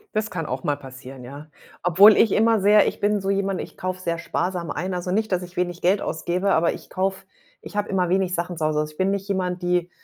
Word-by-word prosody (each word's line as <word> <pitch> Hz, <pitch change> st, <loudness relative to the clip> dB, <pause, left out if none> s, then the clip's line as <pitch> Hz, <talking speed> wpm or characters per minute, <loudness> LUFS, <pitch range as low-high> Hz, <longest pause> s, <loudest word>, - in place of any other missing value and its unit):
Das 215 Hz, 0 st, 0 dB
kann 165 Hz, -3 st, -4 dB
auch 130 Hz, -1 st, -4 dB
mal 145 Hz, -1 st, 0 dB
passieren, 130 Hz, -1 st, -11 dB
ja. 140 Hz, +5 st, -10 dB, 0.3 s
Obwohl 195 Hz, +5 st, +7 dB
ich 220 Hz, -, +4 dB
immer 225 Hz, -1 st, +3 dB
sehr 210 Hz, +1 st, +5 dB
ich -, -, -3 dB
bin 205 Hz, 0 st, +1 dB
so 195 Hz, 0 st, -3 dB
jemand 195 Hz, -1 st, -1 dB
ich -, -, -8 dB
kaufe 185 Hz, 0 st, -4 dB
sehr 170 Hz, -2 st, -2 dB
sparsam 175 Hz, -1 st, -3 dB
ein, 185 Hz, +1 st, -3 dB
also 180 Hz, 0 st, -4 dB
nicht, 215 Hz, +1 st, 0 dB
dass 185 Hz, 0 st, +1 dB
ich 180 Hz, 0 st, -11 dB
wenig 175 Hz, 0 st, -2 dB
Geld 190 Hz, +3 st, +2 dB
ausgebe, 180 Hz, +4 st, -1 dB
aber 165 Hz, +1 st, +3 dB
ich -, -, -11 dB
kaufe 190 Hz, +1 st, -2 dB, 0.4 s
ich -, -, -10 dB
habe 205 Hz, 0 st, -1 dB
immer 180 Hz, -3 st, 0 dB
wenig 185 Hz, -1 st, +1 dB
Sachen 175 Hz, 0 st, -3 dB
zu 160 Hz, -, -3 dB
Hause. 155 Hz, -1 st, +1 dB
Also, 155 Hz, 0 st, -5 dB
ich 150 Hz, -, -22 dB
bin 190 Hz, +1 st, +1 dB
nicht 200 Hz, -1 st, -2 dB
jemand, 185 Hz, -2 st, -2 dB
die 175 Hz, 0 st, 0 dB
180 Hz, 250 wpm, -23 LUFS, 170-195 Hz, 0.4 s, Obwohl